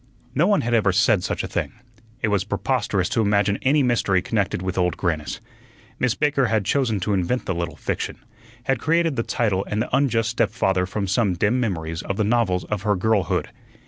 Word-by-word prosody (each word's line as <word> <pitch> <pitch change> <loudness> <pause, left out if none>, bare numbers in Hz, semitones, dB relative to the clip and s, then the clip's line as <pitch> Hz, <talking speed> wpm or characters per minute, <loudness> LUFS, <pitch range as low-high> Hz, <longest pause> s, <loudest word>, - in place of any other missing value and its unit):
No 155 +7 +3
one 205 -1 +3
had 120 +1 -2
ever 105 -4 +3
said 95 0 +3
such - - -2
a - - -3
thing. - - -3 0.5
It 110 - +2
was 100 -3 +1
preposterous 100 -2 -1
to 115 - +1
imagine 100 -1 +2
any 140 +2 +3
mystery 110 -6 +2
connected 100 0 -1
with 95 -1 -2
Old 90 -1 0
Grannis. 75 -6 -2 0.6
Miss 125 -1 +1
Baker 145 -3 +2
had 110 -3 0
chosen 120 -6 +1
to 105 +3 0
invent 100 +7 0
the 95 - -1
little 85 0 -3
fiction, - - -3 0.5
had 135 -1 0
created 165 -1 +1
the 115 - 0
title 105 -5 0
and 105 - -1
the 120 +3 0
unjust 115 -5 +2
stepfather 95 -4 +1
from 100 +1 -2
some 100 -1 +1
dim 105 +8 +1
memories 80 -8 -2
of 100 - -4
the 110 - +2
novels 105 -5 +1
of 105 -3 -3
her 105 0 +1
girlhood. 100 -2 0
105 Hz, 200 wpm, -23 LUFS, 95-120 Hz, 0.6 s, No